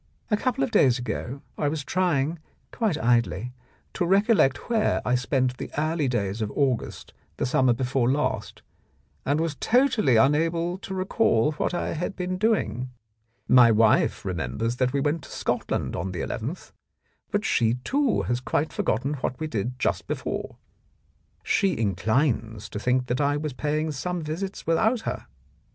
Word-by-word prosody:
"A - - +5
couple 245 - 0
of - - -1
days 130 -3 +4
ago 125 +2 -5 0.2
I 145 - +1
was 150 0 -2
trying 165 -1 0 0.2
— - - -40
quite 215 -9 0
idly 120 -2 +1 0.2
— - - -37
to - - -1
recollect 195 - +3
where 225 -2 +2
I 125 - +1
spent 125 0 0
the - - -6
early 155 -1 0
days 105 -3 -1
of 105 - -1
August 135 -5 -1 0.2
the - - 0
summer 130 0 +3
before 125 0 +1
last, 145 +2 -2 0.6
and 145 +3 +2
was 165 -2 0
totally 230 - +3
unable 165 +8 +2
to 190 -1 -6
recall 185 - +2
what 155 +3 -2
I - - -2
had 180 +4 -3
been 185 0 -3
doing. 195 - 0 0.6
My 125 -2 +7
wife 110 -2 +3
remembers 90 - -2
that 125 -1 +1
we 140 - 0
went 150 +3 0
to - - -13
Scotland - - -2
on 90 +3 -3
the 85 - -3
nth, 135 +11 -5 0.6
but 205 0 -1
she, 115 - +2
too, 280 -2 +1
has 120 0 -1
quite 145 +4 -1
forgotten 135 +6 0
what 125 - -2
we 155 - -2
did 125 -3 -3
just - - -1
before. - - -4 0.9
She 195 -2 +1
inclines 110 - 0
to 105 - -5
think 125 +3 +1
that 125 +2 -1
I 145 0 +2
was 150 -2 -3
paying 155 +3 -1
some 175 +4 -3
visits 180 +6 -5
without 220 +9 +2
her. - - -5
140 Hz, 165 wpm, -25 LUFS, 125-175 Hz, 0.9 s, My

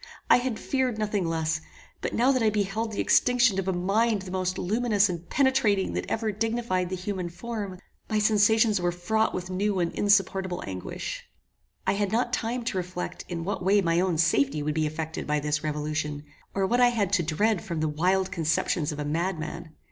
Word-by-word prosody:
I - - +9
had 245 -2 -2
feared 260 -3 -1
nothing 210 -4 -1
less; 160 -1 -1 0.4
but - - -3
now 250 +4 +4
that 255 -2 +1
I 220 - +4
beheld 215 +2 -1
the 205 - -5
extinction 245 -5 +3
of 190 - -3
a - - +2
mind 200 +4 +1
the 185 - -8
most 185 -1 -1
luminous 210 0 +2
and 175 -1 -6
penetrating 265 -8 +2
that - - -3
ever 220 -1 0
dignified 220 -4 -1
the 185 - -2
human 185 -1 -4
form, 200 +1 -5 0.3
my 215 - +1
sensations 215 0 +4
were 175 0 +1
fraught 220 +6 0
with 185 0 -5
new 195 +1 0
and 170 -1 0
insupportable 195 -3 +1
anguish. 95 -1 -5 0.6
I - - +2
had 200 -1 -1
not 240 +2 0
time 240 +1 -1
to 215 - -2
reflect 180 0 -4
in 170 -2 -3
what 195 0 -3
way 200 +3 +4
my 170 -3 +2
own 180 -3 +1
safety 150 -2 +2
would 150 +1 -1
be 155 0 +1
effected 160 +1 -5
by 150 0 +1
this 150 +1 -1
revolution, 150 -1 -2 0.3
or 195 -1 +2
what 245 +5 +2
I 245 - +7
had 210 -5 0
to 195 - +4
dread 180 +6 +1
from 170 -3 -4
the 155 - +1
wild 185 +5 +1
conceptions 160 -1 0
of 150 - -6
a 150 - -3
madman. 165 0 -3
190 Hz, 200 wpm, -27 LUFS, 165-215 Hz, 0.6 s, I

